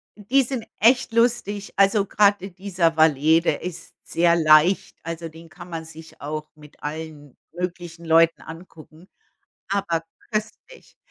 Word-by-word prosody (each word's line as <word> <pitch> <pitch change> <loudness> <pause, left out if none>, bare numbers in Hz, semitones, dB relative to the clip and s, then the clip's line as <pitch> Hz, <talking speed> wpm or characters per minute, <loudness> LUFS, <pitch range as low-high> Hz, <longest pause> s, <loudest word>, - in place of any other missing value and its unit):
die 250 +6 +2
sind 250 -2 -4 0.2
echt 240 +2 +4
lustig. 230 -4 0
Also 200 +1 +3
gerade 200 -1 +2
dieser 180 -3 -1
Valet, 160 +1 +4
der - - 0
ist 175 -2 -8
sehr 170 0 +2
leicht, 155 +3 +4
also 165 0 -6
den 165 +1 -14
kann 175 +1 -12
man 160 -1 -5
sich 160 0 -14
auch 155 +1 -5
mit 150 -1 -18
allen 150 -2 -7 0.2
möglichen 175 -1 -6
Leuten 165 +1 +4
angucken, 165 +1 -13 0.6
aber 170 -5 -1 0.3
köstlich. 215 - -6
170 Hz, 135 wpm, -23 LUFS, 160-200 Hz, 0.6 s, echt